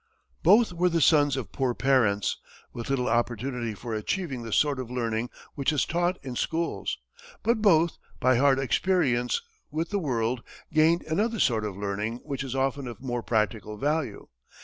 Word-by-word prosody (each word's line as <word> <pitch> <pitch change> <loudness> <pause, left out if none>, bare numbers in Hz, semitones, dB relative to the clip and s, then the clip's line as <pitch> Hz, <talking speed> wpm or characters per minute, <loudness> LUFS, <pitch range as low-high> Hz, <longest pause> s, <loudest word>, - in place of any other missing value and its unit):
Both 220 -3 +5
were 180 +1 +2
the 165 -1 +1
sons 145 -2 +4
of 130 - -5
poor 130 -3 -1
parents, 120 -7 +2 0.3
with 120 +1 -6
little 130 -2 0
opportunity 120 0 -1
for 115 +2 -6
achieving 135 - -2
the 115 -1 -7
sort 145 +3 +2
of 125 -2 -5
learning 120 -1 -2 0.2
which 140 +1 0
is 145 -5 +1
taught 175 +2 0
in 130 -2 -5
schools; 160 - -2 0.5
but 230 0 +2
both, 170 -5 +4 0.2
by 130 -1 +4
hard 135 +1 +4
experience 135 -4 +1 0.3
with 160 +5 -3
the 205 - +1
world, 120 -6 -1 0.3
gained 160 +2 +4
another 215 +8 0
sort 115 -8 +2
of 100 -3 -4
learning 105 +3 -2
which 140 -1 -4
is 135 -1 -5
often 135 0 -1
of 120 -4 -7
more 120 -2 -3
practical 110 -1 -1
value. 145 -4 -1
130 Hz, 170 wpm, -27 LUFS, 115-160 Hz, 0.5 s, Both